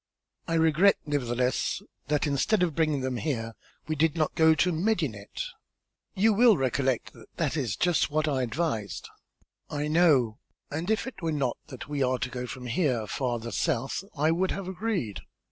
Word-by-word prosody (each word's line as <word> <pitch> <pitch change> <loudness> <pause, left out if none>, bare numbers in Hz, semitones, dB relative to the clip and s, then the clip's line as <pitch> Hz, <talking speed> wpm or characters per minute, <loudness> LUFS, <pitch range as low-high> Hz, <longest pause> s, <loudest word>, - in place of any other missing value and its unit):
"I 165 - 0
regret, 160 +5 +4
nevertheless, 125 -4 0 0.3
that 150 0 +1
instead 155 +8 +2
of 170 -3 +1
bringing 155 -3 +1
them 130 -1 -2
here, 115 -6 -2 0.3
we 155 - -1
did 160 +1 +2
not 155 -2 +1
go 160 -1 +5
to 180 +3 +2
Medinet." 160 - -1 0.7
"You 215 +3 +4
will 225 -1 +6
recollect 130 -1 0
that - - -15
that 155 -3 0
is 125 -10 -1
just 170 - +2
what 155 +1 0
I 135 -3 +1
advised." 115 - -2 0.6
"I 150 0 -2
know, 150 -9 +3 0.3
and 160 +6 -3
if 220 0 +1
it 260 -7 -8
were 165 -1 0
not 140 -5 -1
that 130 -2 -9
we 145 -1 -2
are 130 0 +2
to 130 - -3
go 125 0 -4
from 125 0 -7
here 125 -3 0
farther 120 -1 -2
south, 135 +1 -1
I 155 +3 +3
would 185 +3 +1
have 195 -2 -3
agreed. 190 - -2
150 Hz, 175 wpm, -28 LUFS, 125-170 Hz, 0.7 s, will